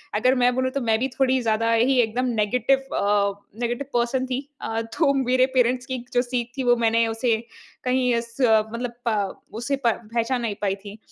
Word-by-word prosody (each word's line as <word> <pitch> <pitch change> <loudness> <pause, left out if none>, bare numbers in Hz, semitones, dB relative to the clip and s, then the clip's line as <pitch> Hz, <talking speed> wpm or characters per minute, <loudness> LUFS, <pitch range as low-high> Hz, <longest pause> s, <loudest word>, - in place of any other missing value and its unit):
अगर 255 +5 +3
मैं 250 0 +4
बोलूँ 260 0 0
तो 275 - -2
मैं 225 -2 +2
भी 260 - 0
थोड़ी 260 -1 +3
ज़्यादा 230 0 +1
ही 250 +3 +3
एकदम 240 +3 -1
नेगेटिव 250 +5 +1
अ, 200 0 +2 0.3
नेगेटिव 240 +3 -2
पर्सन 245 +2 +1
थी। 255 0 -2 0.2
अ, 225 0 -2
तो 275 +6 +1
मेरे 255 +1 +3
पेरेंट्स 250 0 +2
की 260 -1 -3 0.2
जो 245 - +4
सीख 245 -1 -3
थी 265 - -1
वो 245 -1 +4
मैंने 230 +1 +3
उसे 225 +1 +1 0.5
कहीं 250 -1 +2
उस 235 0 -6
मतलब 230 +1 +2
प 205 -4 -1 0.2
उसे 275 +3 0
प - - +6 0.3
पहचान 240 +2 0
नहीं 225 -3 -2
पाई 195 -1 0
थी। 205 +2 -8
240 Hz, 195 wpm, -24 LUFS, 225-255 Hz, 0.5 s, प